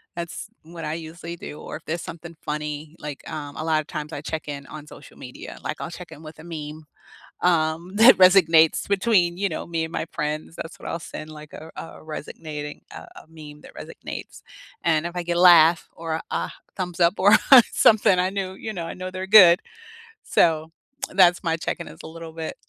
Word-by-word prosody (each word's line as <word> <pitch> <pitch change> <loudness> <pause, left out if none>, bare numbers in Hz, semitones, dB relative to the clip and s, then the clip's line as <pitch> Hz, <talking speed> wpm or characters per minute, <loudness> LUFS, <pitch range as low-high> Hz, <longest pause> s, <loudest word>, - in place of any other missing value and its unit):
That's 170 +4 -6 0.2
what 165 +1 -10
I 150 +1 -3
usually 165 +1 -8
do, 150 - -9
or, - - -7
if - - -21
there's 165 +2 -3
something 170 0 -9
funny, 150 +1 -5
like, 145 -2 -7
um, 145 -2 -6
a 155 - -5
lot 160 -1 +2
of 150 - -15
times 150 0 -6
I 145 - -6
check-in 145 -3 -5
on 150 -1 -10
social - - -14
media, - - -10
like, - - -4
I'll - - -5
check-in 165 -3 -11
with 155 0 -11
a - - -11
meme, 155 -2 -8 0.6
um, 170 +2 +1
that 235 +4 +8
resonates 170 -4 +5
between, 190 -4 +2
you 200 0 0
know, 160 - -5
me 165 -1 -2
and 160 - -5
my - - -3
friends, 150 +2 -4
that's 165 - -8
what - - -9
I'll 165 - -3
send, 155 -1 -8
like, 150 -1 -12
a 160 - -10
a - - -6 0.2
resonating 150 -1 -7
a - - -8 0.2
a - - -24
meme 150 -2 -12
that - - -15
resonates. - - -9 0.4
And, 160 -1 +2
if 175 +1 -5
I 175 - -2
get 170 0 -2
a - - +2
laugh, 170 -2 +7
or 165 -1 -4
a - - -5
a 85 +1 -2 0.2
thumbs 180 -2 -5
up, 170 +3 +4
or 200 +2 +6 0.4
something, 210 -4 +4
I 180 +1 +2
knew 195 -2 -3
you 220 +3 -6
know, 170 -3 -5
I - - -6
know 185 0 -6
they're 185 0 -5
good. 185 -4 +8 0.7
So, 160 -1 +2 0.4
that's 180 -2 +4
my 165 -1 0
check-in 160 - -4
is - - -14
a - - -8
little 165 0 -9
bit, 160 -1 -6
165 Hz, 210 wpm, -23 LUFS, 155-175 Hz, 0.7 s, that